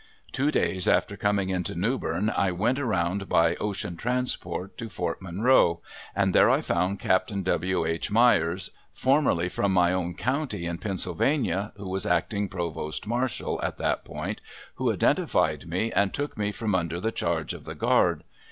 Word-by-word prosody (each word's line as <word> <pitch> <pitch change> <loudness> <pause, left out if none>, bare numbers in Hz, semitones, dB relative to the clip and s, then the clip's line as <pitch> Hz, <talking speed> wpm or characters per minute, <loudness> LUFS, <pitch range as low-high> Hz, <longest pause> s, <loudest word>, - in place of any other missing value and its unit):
Two 140 +3 +1
days 95 -10 0
after 100 - +2
coming 100 -2 0
into 90 -3 -2
Newbern 105 -1 0
I 95 -2 +1
went 110 +9 0
around 95 -6 -1
by 85 0 +4
ocean 95 -4 -4
transport 115 -6 -2
to 115 -2 -5
Fort 90 -3 -3
Monroe, 90 -2 +3 0.3
and 95 -1 +2
there - - +6
I - - +4
found 95 +2 0
Capt. 95 +6 +2
W. 90 -1 0
H. 80 +4 -2
Meyers, 100 -6 +3 0.2
formerly 130 - +2
from 100 +2 0
my 90 -1 +4
own 90 -2 -2
county 130 - -2
in 85 0 -3
Pennsylvania, 100 - -1
who 100 -1 -7
was 95 0 -2
acting 100 +4 0
provost 85 -3 -4
marshal 120 +2 -1
at - - -2
that - - -1
point, - - -5 0.3
who - - 0
identified - - +1
me 95 +7 -1
and 100 -2 +2
took 145 +1 -3
me 105 -1 -1
from 105 0 -2
under 85 -2 0
the 110 +5 -1
charge 85 -6 -1
of - - -10
the - - -6
guard. - - +2
95 Hz, 165 wpm, -26 LUFS, 85-110 Hz, 0.3 s, there